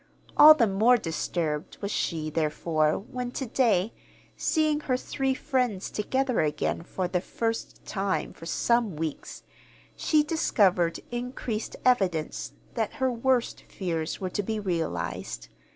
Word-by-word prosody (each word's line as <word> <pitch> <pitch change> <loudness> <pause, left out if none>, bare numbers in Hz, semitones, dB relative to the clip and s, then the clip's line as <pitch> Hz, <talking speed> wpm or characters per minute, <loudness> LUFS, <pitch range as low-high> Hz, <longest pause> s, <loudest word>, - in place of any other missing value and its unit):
All 305 +1 +10
the 250 -6 +4
more 220 +5 +4
disturbed 160 -4 -3
was 200 0 -3
she, 155 -5 -1
therefore, 155 0 +1
when 250 +3 -5
to 265 - -3
day, 225 -5 +2 0.4
seeing 310 -2 +1
her 260 -4 0
three 265 +1 -1
friends 250 -9 -1
together 260 +3 0
again 150 +1 -1
for 180 +2 -3
the 180 0 -1
first 225 +3 -3
time 195 -1 -2
for 165 - -10
some 235 -2 +1
weeks, 155 -1 -5 0.5
she 305 -1 +3
discovered 195 - +2
increased 240 -2 -4
evidence 190 -11 +1 0.2
that 225 -2 -1
her 260 -1 0
worst 245 +1 0
fears 165 -4 -3
were 185 -1 -3
to 205 - -1
be 220 +2 -2
realized. 165 - -3
210 Hz, 135 wpm, -27 LUFS, 170-250 Hz, 0.5 s, All